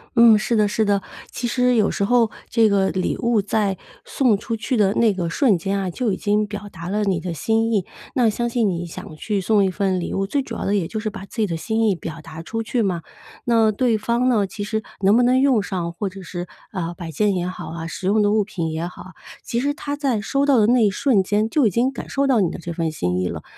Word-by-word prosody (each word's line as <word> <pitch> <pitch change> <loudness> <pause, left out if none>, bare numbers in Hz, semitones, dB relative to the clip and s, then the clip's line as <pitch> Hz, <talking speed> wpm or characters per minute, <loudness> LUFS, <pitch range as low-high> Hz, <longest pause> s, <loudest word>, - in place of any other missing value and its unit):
嗯， 230 -2 +7
是 225 +2 0
的 210 -1 +4
是 220 +2 0
的。 200 -1 +1 0.3
其 240 - -3
实 250 0 +2
有 215 -3 +3
时 - - -1
候 230 0 +3 0.2
这 225 -2 +4
个 195 -2 +2
礼 185 -1 -1
物 235 -3 +2
在 200 -1 0 0.3
送 245 -7 +2
出 225 +2 -4
去 255 +4 -2
的 205 -3 +3
那 225 -3 +3
个 175 -3 -2
瞬 215 - +3
间 195 +3 -2
啊， 190 - -2
就 225 +4 -1
已 185 - -2
经 210 0 +1
表 205 0 -7
达 170 -2 -8
了 210 +1 0
你 185 -4 0
的 175 -2 -4
心 225 +8 0
意， 200 -5 +1 0.3
那 240 -4 +3
相 240 +3 -1
信 230 -4 +1
你 175 -1 -3
想 160 -1 -9
去 205 +6 -2
送 205 +2 +3
一 190 - +2
份 190 -2 0
礼 - - -4
物， 195 0 -1
最 280 +7 0
主 265 - -7
要 - - -4
的 200 - +1
也 190 -5 +1
就 220 +5 -4
是 215 0 -2
把 195 - -9
自 215 - -15
己 215 - +2
的 165 - -2
心 220 +6 0
意 195 - +2
表 165 -1 -7
达 160 +1 -9
出 225 +5 -3
去 235 +1 -1
嘛。 180 -5 -1 0.4
那 225 -2 +4
对 230 +1 +1
方 235 +3 0
呢， 220 -6 +3
其 205 +2 -6
实 220 +1 -2 0.2
能 195 +2 +4
不 245 - +4
能 255 +1 +4
用 260 -6 +3
上， 175 -4 -3
或 195 +2 -3
者 195 +1 -10
是， 175 0 -6 0.3
呃， 175 -2 -3
摆 170 -2 -7
件 200 +6 +1
也 180 -1 -1
好 185 - -6
啊， 165 0 -6
实 185 - -7
用 210 +2 +3
的 205 0 +3
物 215 -1 +3
品 170 -5 -4
也 160 +2 -3
好 180 - -9
啊， 185 - -12 0.3
其 235 +1 -1
实 285 +1 0
她 290 -2 -4
在 270 -7 0
收 275 +7 0
到 275 -3 +4
的 215 -1 +4
那 240 -2 +4
一 200 - +3
瞬 205 -1 +2
间 210 +3 0
就 290 -1 +2
已 - - +3
经 235 +7 +1
感 270 - -8
受 275 0 +1
到 250 -5 +3
你 175 - +2
的 - - -7
这 170 0 -6
份 165 -1 -1
心 90 - -1
意 90 - -1
了。 - - -6
205 Hz, 295 characters per minute, -22 LUFS, 185-230 Hz, 0.4 s, 嗯